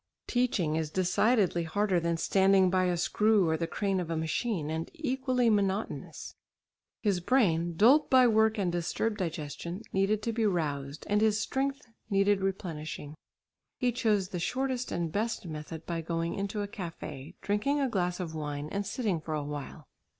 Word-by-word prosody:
Teaching 205 -11 +1
is 160 -2 -1
decidedly 185 +2 +2
harder 185 +3 +1
than 170 0 0
standing 190 +1 +4
by 185 -1 +3
a 180 -1 +1
screw 210 +2 +3
or 160 - +2
the 165 +1 -2
crane 195 0 -1
of 175 -2 -4
a 165 - -1
machine, 160 0 -1
and 160 +1 -3
equally 260 -5 0
monotonous. 200 -1 -1 0.7
His 200 -4 +2
brain, 175 -6 +2
dulled 255 - +5
by 260 -1 +6
work 220 -1 +4
and 190 -4 0
disturbed 175 +5 -1
digestion, 170 +2 -4
needed 200 +2 +1
to 230 - -1
be 225 0 0
roused, 145 -5 -2
and 205 +1 +2
his 215 -1 +3
strength 275 +4 -2 0.2
needed 195 0 +3
replenishing. 160 -6 -4 0.6
He 250 -2 +1
chose 215 -6 +1
the 180 - -4
shortest 255 +6 -1
and 170 -2 -2
best 220 +2 -2
method 155 0 -7
by 170 -1 -2
going 165 +1 -2
into 200 +1 -2
a - - -4
café, 165 -6 -7
drinking 210 +9 0
a 275 - +2
glass 180 -6 -1
of 170 -3 -4
wine, 150 -1 -4
and 200 +2 -3
sitting 205 -10 -1
for 155 0 -3
a 150 - -2
while. 145 -1 -7
190 Hz, 170 wpm, -30 LUFS, 165-220 Hz, 0.7 s, by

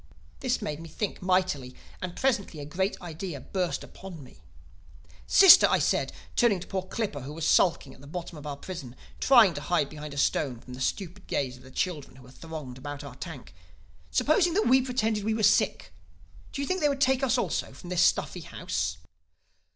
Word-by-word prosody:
"This 255 -4 -1
made 150 -7 -3
me 165 0 -9
think 205 +6 -4
mightily; 185 -9 0 0.3
and 180 -1 -5
presently 215 - 0
a 145 - -6
great 190 +7 -2
idea 170 -2 -6
burst 180 +6 -2
upon 180 -6 -10
me. 125 - -16 0.9
"'Sister,' 385 -2 +9
I - - +4
said, - - +1 0.2
turning 230 -6 +3
to 175 - -8
poor 190 -1 -2
Clippa 190 -5 -4
who 140 +4 -7
was 160 0 -4
sulking 165 -6 +3
at - - -17
the 140 - -13
bottom 170 +2 -6
of 150 0 -9
our 140 -1 -5
prison 140 -7 -8 0.2
trying 235 -9 +6
to 145 - -5
hide 170 -5 0
behind 150 -1 -8
a - - -9
stone 135 -3 +1
from 125 - -12
the 125 - -8
stupid 190 +5 -3
gaze 130 -3 -1
of 125 - -16
the 130 - -14
children 150 -1 -3
who 130 -1 -15
thronged 145 -3 -8
about 145 +1 -7
our 140 -3 -9
tank, 135 - -9 0.6
'supposing 335 +3 +2
that 420 - +2
we 260 +1 +5
pretended 225 -5 -1
we 220 +1 0
were 220 - -2
sick: - - +2 0.6
do 280 - -3
you - - -3
think 370 0 -1
they 295 - +4
would 280 -1 -2
take 265 -1 +3
us 260 -1 +2
also - - -1
from 180 - -11
this 180 -1 +2
stuffy 180 - +2
house? 90 - -3
175 Hz, 200 wpm, -28 LUFS, 140-215 Hz, 0.9 s, Sister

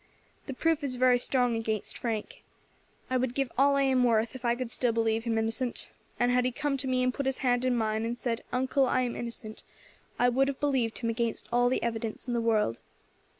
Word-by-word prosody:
The 270 - -5
proof 325 +1 +1
is 265 -3 0
very 250 0 +4
strong 245 -2 +1
against 220 -2 -2
Frank. 225 -3 -4 0.7
I 260 - +3
would 250 -1 -1
give 270 -3 -1
all 280 +2 +4
I 275 - +3
am 260 -2 +3
worth 230 -2 +2
if 260 -1 -9
I 235 -1 +2
could 245 -1 -4
still 245 -2 +1
believe 225 0 0
him 230 -1 0
innocent, 225 +3 -2 0.3
and 245 0 +3
had 250 0 +3
he 255 - 0
come 290 +2 -1
to 270 - -3
me 255 -1 +1
and 255 0 +1
put 280 +1 -2
his 265 - 0
hand 245 0 +2
in 255 -1 +2
mine, 220 -1 0
and 235 +1 -2
said, 235 -1 -2
'Uncle, 260 +1 +2
I 255 - +2
am 245 -2 -2
innocent,' 230 -2 -7 0.6
I 245 - +4
would 265 +2 +3
have 275 -1 -3
believed 260 -6 0
him 230 -2 -1
against 230 -1 -2
all 245 +1 +3
the 260 - 0
evidence 225 0 -3
in 245 - -1
the 235 - +1
world. 215 - +1
245 Hz, 230 wpm, -29 LUFS, 230-260 Hz, 0.7 s, very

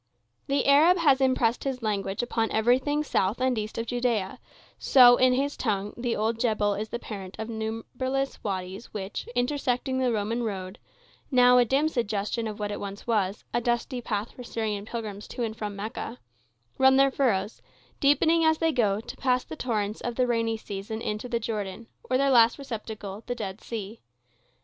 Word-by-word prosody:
The 275 0 +1
Arab 310 +6 +6
has 280 -6 +4
impressed 255 -3 +2
his 260 -3 -3
language 200 -1 -1
upon 225 -2 0
everything 260 +7 +2
south 205 -5 0
and 255 0 +2
east 215 -1 -4
of 230 - -2
Judea, 235 -5 -1 0.4
so, 245 -2 +7
in 255 0 +4
his 280 +3 0
tongue, 205 -3 -2
the 240 0 -2
old 220 +2 -1
Jebel 215 -3 +1
is 215 +2 -4
the - - -3
parent 195 -5 -8
of 220 +1 -5
numberless 240 +5 -3
wadies 190 +1 -4
which, 195 -1 -5
intersecting 260 0 0
the 255 -2 +2
Roman 225 +2 -1
road—now 245 - 0
a 245 - +5
dim 275 +6 +2
suggestion 225 -4 -1
of 210 -1 -5
what 205 0 -2
once 200 0 -6
it - - -20
was, 205 -3 0
a 240 - +1
dusty 240 +2 -1
path 210 -1 -3
for 250 - -10
Syrian 215 -3 -3
pilgrims 215 -3 -6
to 245 - -4
and 220 -1 -3
from 210 -2 -5
Mecca—run 125 - -2
their 275 0 +5
furrows, 230 -6 0 0.4
deepening 320 +4 +4
as 315 0 +4
they 325 0 +2
go, 215 -6 +1
to - - -9
pass 255 -1 +1
the - - -8
torrents 215 -6 -2
of 240 -1 -3
the 255 - +2
rainy 230 -2 0
season 205 +1 -6
into 215 +4 -3
the 235 -1 0
Jordan, 215 -1 -4 0.2
or 255 - +3
their 275 +1 +2
last 235 -2 +6
receptacle, 220 -6 -6
the 245 - -2
Dead 200 -3 -6
Sea. 220 -1 -6
230 Hz, 180 wpm, -27 LUFS, 210-255 Hz, 0.4 s, so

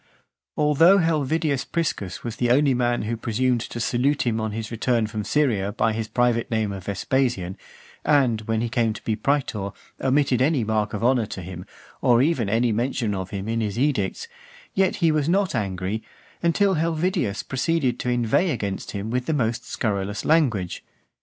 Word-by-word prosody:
Although 150 +6 +5
Helvidius 155 -4 +1
Priscus 105 - -3
was 120 -2 -5
the 120 - +1
only 135 +2 +4
man 120 -2 +1
who 115 +2 -2
presumed 120 +2 0
to 120 - -6
salute 130 +5 +1
him 115 -2 0
on 110 -1 -2
his 110 +1 -5
return 115 0 +1
from 105 -1 -4
Syria 105 -5 +1
by 110 0 +1
his 110 0 -3
private 120 +1 +1
name 110 -3 0
of 95 -2 -7
Vespasian, 100 -1 -1 0.5
and, 130 -7 +3
when 115 0 0
he 120 - 0
came 115 -2 +1
to - - -10
be 110 - 0
praetor, 110 -5 -1 0.3
omitted 135 -2 +2
any 140 -2 +2
mark 105 -1 -1
of 105 - -4
honour 120 -3 +3
to 95 - -7
him, 90 0 -8 0.4
or 120 -1 +4
even 130 -6 +2
any 115 +2 +2
mention 115 -1 -1
of 95 -1 -4
him 100 0 -5
in 115 0 -1
his 105 -1 -2
edicts, 135 - 0 0.5
yet 190 -1 +2
he 165 -3 +2
was 155 0 +1
not 195 +1 +2
angry, 100 -1 -2 0.4
until 190 +4 +3
Helvidius 165 - 0
proceeded 135 -1 0
to 125 - -2
inveigh 120 +9 +2
against 100 -9 -3
him 105 +2 -4
with 125 0 -1
the 160 - +1
most 120 -4 -1
scurrilous 105 -2 -2
language. 120 - +1
120 Hz, 180 wpm, -24 LUFS, 105-145 Hz, 0.5 s, Although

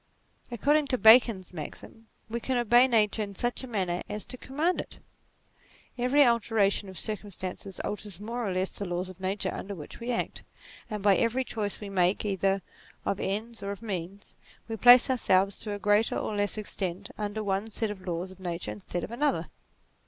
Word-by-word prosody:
According 285 +5 +2
to 255 - +1
Bacon's 220 -5 +6
maxim, 180 +7 -8 0.2
we 230 +2 -3
can 255 +2 -1
obey 240 +2 +5
nature 220 -3 +2
in 200 -1 -4
such 240 +5 -1
a - - -6
manner 185 -6 -1
as 210 - -4
to - - -5
command 300 +8 -1
it. - - -12 1.0
Every 255 +4 +4
alteration 220 -4 +2
of 190 - -9
circumstances 195 -1 -5
alters 205 -3 -4
more 230 +2 -3
or - - -1
less 185 +1 0
the - - -6
laws 175 +1 -3
of 185 0 -12
nature 190 +2 -2
under 200 0 -5
which 150 -4 -9
we 240 +1 -3
act; 235 - -2 0.5
and 210 -3 -4
by 200 -2 +5
every 240 +3 +1
choice 210 -5 -2
which 210 - -7
we 200 - -8
make 185 +2 +2
either 195 -1 +1 0.4
of 200 - -1
ends 220 +4 -3
or 200 - -4
of 200 +3 -8
means, 195 -1 -5 0.3
we 225 - -3
place 245 +3 +8
ourselves 200 -6 +2
to 215 - -4
a - - -3
greater 205 +2 +2
or 215 - -2
less 205 0 0
extent 200 -2 -4
under 210 0 -3
one 200 +2 -1
set 220 0 -2
of 200 -2 -8
laws 175 +2 -3
of 190 - -14
nature 170 - -4
instead 105 - -5
of - - -6
another. 285 +5 0
205 Hz, 190 wpm, -28 LUFS, 190-235 Hz, 1.0 s, place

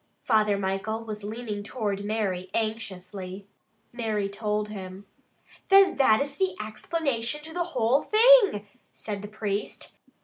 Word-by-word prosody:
'" - - -45
Father 210 -2 +3
Michael 195 +3 -2
was 215 -2 -7
leaning 215 -1 -5
toward 205 -2 -3
Mary 200 -4 -2
anxiously. 200 -3 -4 0.5
Mary 220 -4 -1
told 210 +1 -2
him. 190 -1 -8 0.6
"Then 390 0 +6
that 220 -6 +5
is 280 0 -3
the 375 -1 0
explanation 235 +4 -2
to 320 +1 -9
the 350 0 -1
whole 240 +4 +3
thing," 435 - +6 0.3
said 205 -2 -6
the 205 - -7
priest. 205 -1 -4
215 Hz, 135 wpm, -27 LUFS, 200-245 Hz, 0.6 s, Then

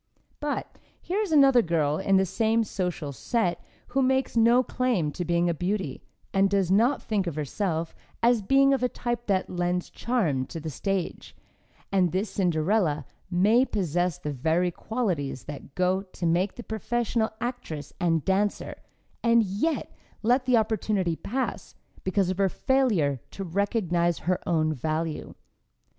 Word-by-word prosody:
But, 295 -1 -4 0.2
here 375 +4 -2
is 420 -5 -1
another 275 -5 +6
girl 155 -5 0
in 195 0 +3
the 190 - +3
same 225 +4 +1
social 180 -8 -3
set 180 - -1 0.3
who 270 +2 +1
makes 265 0 +1
no 235 +2 +5
claim 240 -13 0
to 175 - -4
being 170 +1 +1
a 170 - +2
beauty, 180 -4 -2 0.3
and 195 0 +4
does 195 -2 +1
not 235 +8 +3
think 200 -4 -1
of 165 - -3
herself 160 +2 -2 0.3
as 235 -1 +4
being 275 +6 +4
of 270 - 0
a 250 - +2
type 240 -1 -3
that 190 -2 +1
lends 180 0 -2
charm 170 - 0
to 165 - -6
the 160 0 -5
stage 195 +4 -3 0.6
and 185 -4 +3
this 190 +3 -1
Cinderella 170 -4 +1 0.2
may 205 +7 +4
possess 180 - -1
the 150 -5 -4
very 165 +7 +1
qualities 175 - -2
that 140 -1 -9
go 185 +1 +2
to 185 -2 -7
make 175 +4 +1
the 240 - -8
professional 225 0 -1
actress 235 - -5
and 165 -4 +1
dancer, 200 +2 0 0.4
and 235 -1 +4
yet 210 - -2 0.3
let 250 +3 +3
the 250 -2 +4
opportunity 210 -5 0
pass 255 +10 -4 0.3
because 185 -1 +1
of 185 - -5
her 195 -1 +3
failure 205 - +1
to 195 - -6
recognize 175 -2 0
her 185 +1 +1
own 155 -2 +2
value. 155 +3 -3
190 Hz, 155 wpm, -26 LUFS, 170-230 Hz, 0.6 s, another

